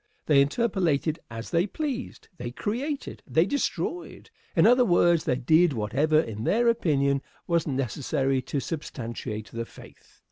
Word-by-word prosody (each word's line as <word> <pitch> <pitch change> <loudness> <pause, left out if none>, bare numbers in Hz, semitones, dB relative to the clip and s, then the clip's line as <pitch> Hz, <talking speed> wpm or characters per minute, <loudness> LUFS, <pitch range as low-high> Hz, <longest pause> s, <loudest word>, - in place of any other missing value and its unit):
They 145 -3 +5
interpolated 165 -3 +1
as 115 0 -7
they 170 +3 +2
pleased. 265 0 -5
They 120 - -4
created. 250 - -4
They 160 +2 +3
destroyed. 285 - -3 0.2
In - - +5
other 250 +2 +6
words, 175 -5 +3
they 125 - +2
did 155 +6 +3
whatever 135 +8 +2
in 110 -7 -3
their 235 - +2
opinion 140 -11 +1 0.2
was 170 -2 +1
necessary 135 0 -1
to 140 - -3
substantiate 115 - -5
the 115 0 -3
faith. - - -17
155 Hz, 140 wpm, -26 LUFS, 130-190 Hz, 0.2 s, other